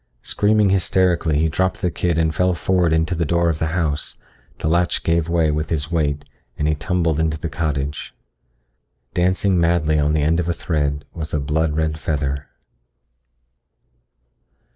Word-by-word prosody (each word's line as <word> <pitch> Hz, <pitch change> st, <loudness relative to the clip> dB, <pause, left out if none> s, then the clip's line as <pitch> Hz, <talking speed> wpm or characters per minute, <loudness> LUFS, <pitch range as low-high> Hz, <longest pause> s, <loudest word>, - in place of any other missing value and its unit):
Screaming 105 Hz, +3 st, +2 dB
hysterically 90 Hz, -4 st, +2 dB
he 80 Hz, +2 st, +2 dB
dropped 95 Hz, +4 st, 0 dB
the 90 Hz, -, +1 dB
kid 85 Hz, 0 st, -1 dB
and 80 Hz, -1 st, +1 dB
fell 90 Hz, +3 st, +1 dB
forward 90 Hz, -1 st, +1 dB
into 80 Hz, +3 st, +1 dB
the 85 Hz, -1 st, 0 dB
door 85 Hz, +2 st, +1 dB
of 80 Hz, -2 st, -2 dB
the 80 Hz, -, 0 dB
house. 80 Hz, -3 st, -1 dB, 0.4 s
The -, -, -3 dB
latch 85 Hz, +2 st, +1 dB
gave 85 Hz, -1 st, +1 dB
way 85 Hz, -2 st, +2 dB
with 75 Hz, 0 st, -2 dB
his 75 Hz, 0 st, -2 dB
weight 75 Hz, -3 st, 0 dB, 0.3 s
and 75 Hz, -, 0 dB
he 75 Hz, -, +2 dB
tumbled 80 Hz, 0 st, 0 dB
into 80 Hz, -1 st, 0 dB
the 80 Hz, +2 st, -4 dB
cottage. 75 Hz, -2 st, -3 dB, 1.0 s
Dancing 95 Hz, +1 st, +2 dB
madly 85 Hz, -2 st, +2 dB
on 75 Hz, +1 st, +2 dB
the 75 Hz, -1 st, +1 dB
end 80 Hz, +3 st, +2 dB
of 85 Hz, 0 st, -1 dB
a -, -, +2 dB
thread 75 Hz, -4 st, -2 dB
was 80 Hz, -2 st, -4 dB
a -, -, +1 dB
blood 75 Hz, +2 st, 0 dB
red 80 Hz, -1 st, -1 dB
feather. 70 Hz, -2 st, -2 dB
80 Hz, 165 wpm, -21 LUFS, 75-85 Hz, 1.0 s, Screaming